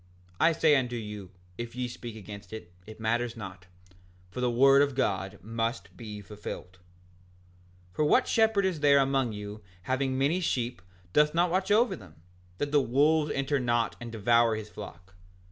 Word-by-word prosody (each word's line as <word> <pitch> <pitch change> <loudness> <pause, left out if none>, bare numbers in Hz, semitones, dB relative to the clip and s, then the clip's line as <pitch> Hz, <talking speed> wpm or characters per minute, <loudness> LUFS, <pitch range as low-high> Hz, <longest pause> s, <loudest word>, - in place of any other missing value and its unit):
I 170 - +5
say 155 -2 +4
unto 125 -3 0
you, 105 -4 -6 0.3
if 120 0 -5
ye 125 0 -2
speak 120 -1 -8
against 100 -2 -10
it, 90 -5 -9
it 110 0 -11
matters 115 +1 -1
not, 95 -3 -9 0.6
for 125 - -5
the 125 - +2
word 135 +3 +6
of 140 -2 +1
God 95 -6 -1
must 115 +3 -3
be 105 -3 -8
fulfilled. 95 -3 -8 1.1
5:59 - - -28
For 150 - +3
what 250 +12 +4
shepherd 220 -3 +3
is 185 -5 -1
there 145 -1 +5
among 135 -3 +2
you 105 +1 -7 0.2
having 130 +4 -1
many 145 +7 +2
sheep 120 - -2 0.3
doth 150 +1 +4
not 175 0 +3
watch 185 +1 0
over 225 +4 +4
them, 90 -7 -14 0.4
that 145 0 -2
the 145 -1 +4
wolves 150 +4 +2
enter 135 +1 0
not 120 -2 0
and 120 -1 -6
devour 115 +1 +3
his 110 -1 -7
flock? 90 +2 -10
120 Hz, 175 wpm, -28 LUFS, 105-145 Hz, 1.1 s, word